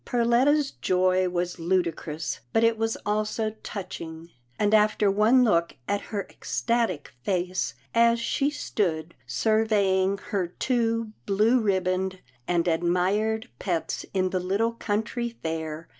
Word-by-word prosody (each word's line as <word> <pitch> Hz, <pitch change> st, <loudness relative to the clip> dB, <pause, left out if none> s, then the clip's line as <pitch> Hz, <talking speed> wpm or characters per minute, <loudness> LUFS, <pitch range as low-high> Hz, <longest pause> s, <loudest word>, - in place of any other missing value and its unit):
Perletta's 255 Hz, +5 st, +2 dB
joy 185 Hz, 0 st, +2 dB
was 175 Hz, 0 st, -2 dB
ludicrous, 165 Hz, -3 st, -1 dB
but 225 Hz, -, +3 dB
it 230 Hz, 0 st, +4 dB
was 225 Hz, 0 st, -1 dB
also 215 Hz, +1 st, 0 dB
touching, 170 Hz, -4 st, -7 dB, 0.3 s
and 210 Hz, 0 st, +1 dB
after 210 Hz, -1 st, +4 dB
one 220 Hz, +6 st, +5 dB
look 170 Hz, -7 st, +2 dB
at 205 Hz, -, 0 dB
her 200 Hz, -3 st, -2 dB
ecstatic 230 Hz, -, -1 dB
face, 185 Hz, +1 st, -1 dB, 0.2 s
as 235 Hz, 0 st, +4 dB
she 275 Hz, +4 st, 0 dB
stood 170 Hz, -, -2 dB
surveying 200 Hz, -, +2 dB
her 190 Hz, -4 st, 0 dB
two 230 Hz, +2 st, -1 dB, 0.2 s
blue 215 Hz, +5 st, +3 dB
ribboned 190 Hz, -2 st, 0 dB, 0.3 s
and 175 Hz, -1 st, +1 dB
admired 185 Hz, +7 st, +1 dB
pets 175 Hz, -4 st, -2 dB
in 185 Hz, -1 st, 0 dB
the 185 Hz, -, 0 dB
little 200 Hz, +6 st, 0 dB
country 230 Hz, +2 st, -2 dB
fair. 160 Hz, 0 st, -4 dB
200 Hz, 125 wpm, -26 LUFS, 180-225 Hz, 0.3 s, one